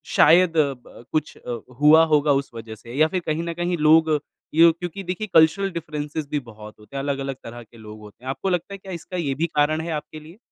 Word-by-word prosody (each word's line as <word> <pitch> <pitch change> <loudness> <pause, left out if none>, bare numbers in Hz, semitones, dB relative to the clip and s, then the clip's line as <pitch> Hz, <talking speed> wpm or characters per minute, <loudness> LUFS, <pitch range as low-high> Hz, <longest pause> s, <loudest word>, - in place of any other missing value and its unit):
शायद 165 +1 +5
अ, 145 -3 +3
ब 125 -2 -16
कुछ 155 -1 -2
अ, 120 -1 -6 0.2
हुआ 155 +2 +7
होगा 150 -2 +3
उस 140 - -18
वजह 115 -1 -8
से? 115 +2 -12
या 155 +1 +5
फिर 185 +3 -2
कहीं 155 +2 -1
न 170 0 -4
कहीं 175 +1 -2
लोग 155 0 +4 0.4
यूँ 165 +1 +7
क्योंकि 175 +2 -6
देखिए, 185 +4 -4
कल्चरल 165 +5 +4
डिफ़रेंसेज़ 155 -2 -5
भी 150 - 0
बहुत 110 -4 -12
होते 105 +6 -15
हैं, 135 - -2
अलग-अलग 135 -1 -3
तरह 120 +1 -9
के 115 +1 -20
लोग 110 -1 -11
होते 105 +3 -15
हैं। - - -4
आपको 190 +8 -3
लगता 180 +2 -2
है, - - -6
क्या 195 0 -11
इसका 175 +2 -7
ये 145 -6 -1
भी 165 +4 0
कारण 155 +2 +2
है 165 +1 -5
आपके 155 0 -5
लिए? 160 +5 -15
155 Hz, 240 wpm, -23 LUFS, 135-170 Hz, 0.4 s, हुआ